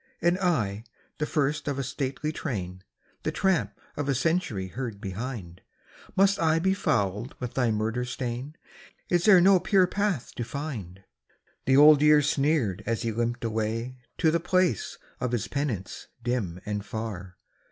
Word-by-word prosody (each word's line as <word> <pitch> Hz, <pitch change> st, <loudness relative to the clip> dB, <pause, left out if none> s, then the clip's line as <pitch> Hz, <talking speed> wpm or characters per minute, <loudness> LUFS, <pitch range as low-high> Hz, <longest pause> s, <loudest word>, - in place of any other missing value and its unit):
" -, -, -44 dB
And 175 Hz, +2 st, +3 dB
I, 115 Hz, -, 0 dB, 0.4 s
the 150 Hz, -, 0 dB
first 150 Hz, +1 st, 0 dB
of 140 Hz, -1 st, -1 dB
a 135 Hz, -, -1 dB
stately 140 Hz, +2 st, -3 dB
train, 95 Hz, -, -4 dB, 0.4 s
The -, -, -1 dB
tramp 145 Hz, -, 0 dB, 0.2 s
of 145 Hz, -1 st, -2 dB
a 135 Hz, -, +2 dB
century 125 Hz, -, 0 dB
heard 115 Hz, -1 st, -5 dB
behind, 95 Hz, -3 st, -6 dB, 0.5 s
Must 195 Hz, +1 st, +4 dB
I 160 Hz, -1 st, +3 dB
be 190 Hz, +3 st, +2 dB
fouled 105 Hz, -, -1 dB
with 125 Hz, -2 st, -5 dB
thy 125 Hz, -3 st, +1 dB
murder 110 Hz, +3 st, -1 dB
stain? 125 Hz, +3 st, -4 dB, 0.5 s
Is 175 Hz, -1 st, +2 dB
there 195 Hz, -4 st, +8 dB
no 190 Hz, +1 st, +6 dB
pure 190 Hz, 0 st, +4 dB
path 195 Hz, -, -1 dB
to 120 Hz, -, -1 dB
find? 115 Hz, -, -6 dB, 0.3 s
" -, -, -40 dB
The 130 Hz, 0 st, +5 dB
Old 150 Hz, 0 st, +8 dB
Year 150 Hz, -1 st, +6 dB
sneered 140 Hz, -, +1 dB
as 115 Hz, 0 st, -1 dB
he 115 Hz, -, 0 dB
limped 120 Hz, +2 st, -2 dB
away 115 Hz, +3 st, -2 dB, 0.2 s
To 160 Hz, -2 st, +3 dB
the 170 Hz, -, +2 dB
place 180 Hz, -, +1 dB, 0.2 s
of 125 Hz, -1 st, -2 dB
his 120 Hz, -, -1 dB
penance 130 Hz, -10 st, -3 dB, 0.2 s
dim 110 Hz, -8 st, -2 dB
and 105 Hz, -1 st, -3 dB
far. 100 Hz, -5 st, -6 dB
130 Hz, 165 wpm, -27 LUFS, 110-155 Hz, 0.5 s, there